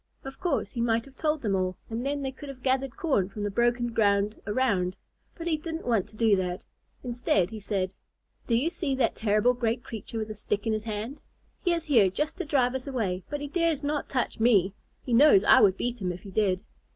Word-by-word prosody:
Of 270 0 -9
course, 355 - -1
he 240 - -3
might 230 -1 +1
have 275 -1 -16
told 305 -2 -1
them 205 -3 +1
all, 185 -1 -1
and 230 +1 -4
then 280 +1 -2
they 265 - -2
could 280 +2 -10
have 260 -2 -10
gathered 265 -1 0
corn 235 - +1
from 205 +1 -6
the 205 - -1
broken 240 +2 +1
ground 205 -1 +2
around, 205 -6 +1 0.4
but 335 - -7
he 325 -2 +1
didn't 325 +1 -6
want 225 -6 +1
to - - -17
do 220 -2 +4
that. 180 -1 -3 0.4
Instead, 235 -6 +1
he 220 - -6
said, 195 -2 -2 0.5
"Do 235 - +2
you 285 +9 +1
see 315 -6 -1
that 255 -3 +1
terrible 215 +3 +2
great 240 0 -1
creature 225 0 -7
with 220 -1 -3
a - - -3
stick 210 0 -3
in 225 - +1
his 215 0 -3
hand? 220 +6 -5 0.4
He 355 - +2
is 335 -1 0
here 235 -11 +4
just 300 - -3
to 365 - -2
drive 260 -4 +2
us 265 +1 -4
away, 210 -9 -1
but 290 -1 -3
he 290 - -3
dares 325 -1 0
not 290 0 -2
touch 255 -3 -1
me. 205 -5 +4 0.3
He 245 - -2
knows 235 -5 +7
I - - +7
would 195 -2 +5
beat 245 -2 -3
him 180 -1 -1
if 175 0 -8
he 195 - -9
did." 190 -2 +1
235 Hz, 235 wpm, -27 LUFS, 205-275 Hz, 0.5 s, knows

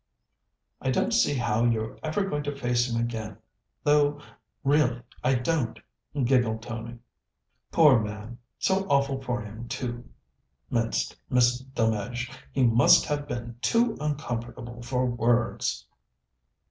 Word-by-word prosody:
"I 130 - -1
don't 130 - +1
see 145 - +3
how 115 -3 +1
you're 110 -2 0
ever 160 +6 -1
going 150 -6 -2
to 145 0 -3
face 120 -2 +1
him 115 - 0
again, 110 -3 -3 0.5
though 145 0 +3 0.4
really 135 -4 +2 0.2
I 130 +1 +3
don't," 125 -2 -1 0.4
giggled 120 -3 +2
Tony. 115 0 -6 0.7
"Poor 150 -7 +6
man! 105 +2 -6 0.2
so 195 0 +1
awful 140 -1 +2
for 125 -2 -2
him, 110 +3 -8
too," 120 -1 -5 0.6
minced - - 0
Miss 125 0 +3
Delmege. 120 -1 -2 0.2
"He 130 - +1
must 120 0 +6
have 145 -1 -2
been 120 -1 -5
too 230 0 +2
uncomfortable 120 -5 -4
for 125 +1 0
words." 120 - 0
120 Hz, 125 wpm, -27 LUFS, 115-140 Hz, 0.7 s, Poor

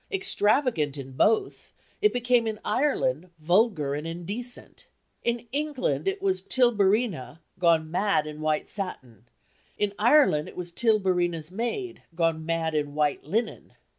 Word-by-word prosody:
Extravagant 225 - +1
in 135 -1 -7
both, 215 +12 0 0.3
it 425 - +4
became 245 -1 +2
in 215 -1 -3
Ireland 185 - 0
vulgar 170 -3 +2
and 150 +3 -4
indecent. 200 +9 -5 0.4
In 235 0 -1
England, 295 +5 -1
it 390 0 -1
was 385 -1 +1
Tilburina, 210 - +1 0.2
gone 165 -3 +3
mad 190 -3 +1
in 150 0 -8
white 155 0 0
satin; 130 - -6 0.5
in 205 -1 0
Ireland 235 - +4
it - - -11
was 175 -1 -6
Tilburina's 180 -6 +1
maid, 240 - -4
gone 165 -2 0
mad 165 -1 -1
in 145 -1 -2
white 150 -3 0
linen. 220 +9 -3
190 Hz, 135 wpm, -26 LUFS, 155-240 Hz, 0.5 s, it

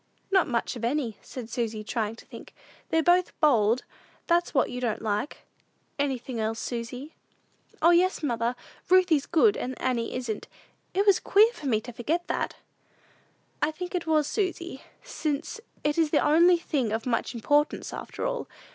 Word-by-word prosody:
"Not 380 -2 +4
much 240 -1 -1
of 235 - -8
any," 240 -3 -1
said 250 -4 -8
Susy, 225 -2 -3
trying 220 0 -2
to - - -15
think; - - -12 0.3
"they're 325 0 +2
both 355 +1 +2
bold; 240 -5 +3 0.4
that's 345 0 +2
what 270 - +2
you 250 0 -5
don't 225 -3 -2
like." 210 +6 -2 0.5
"Anything 260 -4 -2
else, 220 +1 -1
Susy?" 250 +6 -5 0.7
"O, 340 - +7
yes, 355 0 +3
mother; 240 -3 0 0.3
Ruthie's 360 -6 +4
good, 405 +6 +4
and 255 +1 -4
Annie 245 -3 -1
isn't. 240 -4 -4 0.5
It 395 +2 +2
was 400 -3 +5
queer 435 +4 +5
for 290 - -7
me 220 -5 +2
to 245 +2 -9
forget 320 +10 -1
that!" - - -2 1.1
"I 295 - +3
should 310 - -5
think 360 +2 -6
it 350 -2 -2
was, 310 -2 +3
Susy, 350 -5 -2 0.2
since 320 - -3 0.2
it 295 +2 +1
is 320 -2 +3
the 295 - +2
only 340 +4 +6
thing 280 -9 -1
of 225 +1 -2
much 245 0 -1
importance, 290 +6 +1
after - - -5
all. - - -2
285 Hz, 170 wpm, -27 LUFS, 235-345 Hz, 1.1 s, O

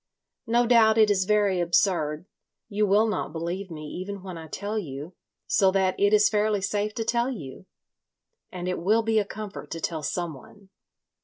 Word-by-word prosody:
"No 240 +1 +3
doubt 225 -2 +5
it 215 -1 +5
is 190 -2 +1
very 205 -2 +2
absurd. 170 -3 +1 0.4
You 210 0 +1
will 205 +3 +4
not 210 -8 -2
believe 170 +4 -4
me 155 -2 -8
even 185 +5 -6
when 185 -2 -7
I 160 -1 -8
tell 205 +6 -3
you, 150 -1 -7 0.3
so 195 - +3
that 190 -1 +2
it 200 0 +4
is 210 -1 +5
fairly 210 -1 +1
safe 205 +2 -2
to 225 - -2
tell 235 +2 +1
you. 185 - -8 0.8
And 180 -1 -5
it 180 - -2
will 215 +7 +2
be 220 0 +2
a 205 - 0
comfort 210 0 -8
to 165 - -5
tell 160 -1 -3
someone. 175 +5 -6
200 Hz, 180 wpm, -26 LUFS, 175-215 Hz, 0.8 s, doubt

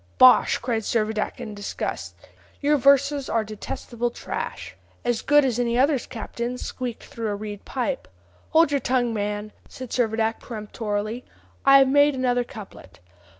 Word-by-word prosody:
'" 85 - -34
"Bosh!" 125 +4 +7
cried 235 -3 -1
Servadac 220 0 -1
in 230 -4 -6
disgust; 205 0 -5 0.4
"your 295 +1 +3
verses 280 0 +3
are 225 - +1
detestable 225 +3 -4
trash." - - -6 0.3
"As 240 -1 +1
good 290 -1 +4
as 245 -2 0
any 235 -1 +1
others, 275 0 +2
captain, 235 +2 -5
squeaked 250 -2 -5
through 230 -1 -5
a 205 - -1
reed 205 -1 -7
pipe." 235 - -3 0.4
"Hold 320 -2 +4
your 285 - +2
tongue, 245 -3 +1
man," 210 0 -3 0.2
said 255 -2 -9
Servadac 225 -2 0
peremptorily; 215 0 -4 0.4
"I 275 0 +9
have 270 -1 +6
made 285 +1 +4
another 245 -1 +1
couplet. 200 - -12
235 Hz, 150 wpm, -24 LUFS, 215-260 Hz, 0.4 s, I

